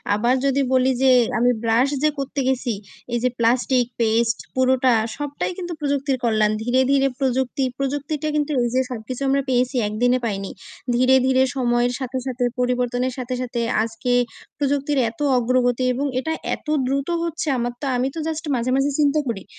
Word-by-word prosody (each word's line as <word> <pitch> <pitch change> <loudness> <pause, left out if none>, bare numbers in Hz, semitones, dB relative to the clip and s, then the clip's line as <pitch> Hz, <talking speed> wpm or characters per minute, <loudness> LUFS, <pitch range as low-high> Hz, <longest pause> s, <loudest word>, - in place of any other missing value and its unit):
আবার 240 +4 +2
যদি 275 0 +2
বলি 260 +1 +3
যে 265 -1 +5 0.3
আমি 245 +1 +4
ব্রাশ 230 +4 +3
যে 305 - +5
করতে 275 +1 -3
গেছি, 255 -3 0 0.4
এইযে 240 +1 +1
প্লাস্টিক, 245 +2 +2
পেস্ট, 230 0 +2 0.2
পুরোটা 260 0 +3 0.3
সবটাই 290 +4 -3
কিন্তু 350 -2 -5
প্রযুক্তির 280 -2 0
কল্যাণ। 215 -2 +2
ধীরে, 250 +3 +2
ধীরে 275 -1 +4
প্রযুক্তি 265 0 0
প্রযুক্তিটা 285 +2 -2
কিন্তু 300 0 0
এইযে 245 +2 +1
সবকিছু 245 +2 -6
আমরা 275 +1 +2
পেয়েছি, 250 +1 +1
১ 210 - -5
দিনে 250 +1 +4
পাইনি। 195 -3 -3 0.4
ধীরে, 255 +2 +4
ধীরে 260 0 +4
সময়ের 245 -1 +1
সাথে, 260 -1 -4
সাথে 250 -1 -2 0.2
পরিবর্তনের 250 0 0
সাথে, 255 0 -4
সাথে 245 -1 -3 0.2
আজকে 225 +2 -3 0.5
প্রযুক্তির 285 0 0
এত 225 - -16 0.2
অগ্রগতি 245 +1 +1
এবং 270 +3 -2
এটা 320 +5 -2 0.2
এত - - -21 0.2
দ্রুত 275 +1 -1 0.2
হচ্ছে! 330 -1 -3
আমার 240 0 -2
তো - - -3
আমি 250 +1 +1
তো - - -4
জাস্ট 320 0 -4
মাঝে, 245 +1 -1
মাঝে 275 +1 +2
চিন্তা 290 +1 +3
করি 220 -5 -3
255 Hz, 170 wpm, -22 LUFS, 240-275 Hz, 0.5 s, যে